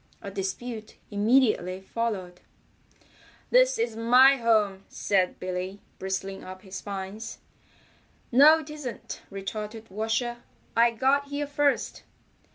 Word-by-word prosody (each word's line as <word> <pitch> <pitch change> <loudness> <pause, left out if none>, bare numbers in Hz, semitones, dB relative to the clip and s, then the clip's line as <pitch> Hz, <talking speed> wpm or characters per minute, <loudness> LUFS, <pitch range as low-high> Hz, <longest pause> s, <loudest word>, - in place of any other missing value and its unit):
A 200 - -7
dispute 215 +3 -5 0.2
immediately 210 -4 +2
followed. 190 -4 -4 1.1
"This - - +5
is 235 - -1
my 250 +4 +6
home," 215 -5 +2
said 185 -3 0
Billy, 185 +2 -4 0.2
bristling 190 0 -4
up 185 0 -10
his 190 -2 -7
spines. 200 +3 -6 0.9
"No, 290 +6 +8
it 305 - -10
isn't," 295 -6 -7
retorted 210 +2 -6
Washer. 225 +4 -1 0.4
"I 235 +1 +6
got 270 +5 +1
here 285 +1 -2
first." 290 0 0
220 Hz, 110 wpm, -27 LUFS, 195-255 Hz, 1.1 s, No